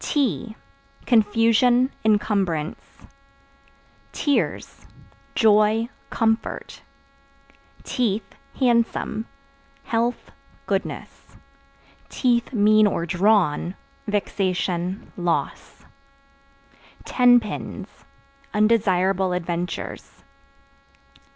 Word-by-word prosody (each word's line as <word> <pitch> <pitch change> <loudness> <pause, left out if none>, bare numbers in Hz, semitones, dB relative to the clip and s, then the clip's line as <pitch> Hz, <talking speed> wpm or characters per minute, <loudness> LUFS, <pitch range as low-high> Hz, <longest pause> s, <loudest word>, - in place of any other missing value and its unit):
Tea 230 - -1 0.5
Confusion, 230 +3 +3
incumbrance. 205 -7 0 1.3
Tears 290 -2 -2 0.5
Joy, 220 +1 +3 0.2
comfort. 225 -1 -2 1.0
Teeth 220 -4 -1 0.3
(Handsome) 235 -3 +1 0.6
health, 235 0 -2 0.3
goodness; - - -5 1.1
(mean 215 -2 +4
or 170 -4 -1
drawn) 180 -2 +2 0.3
vexation, 185 -3 -2
loss. 175 -2 -3 1.2
Ten 245 -1 +5
Pins 215 -3 -6 0.7
Undesirable 195 -4 +2
adventures. 170 - -5
210 Hz, 55 wpm, -23 LUFS, 185-230 Hz, 1.3 s, Ten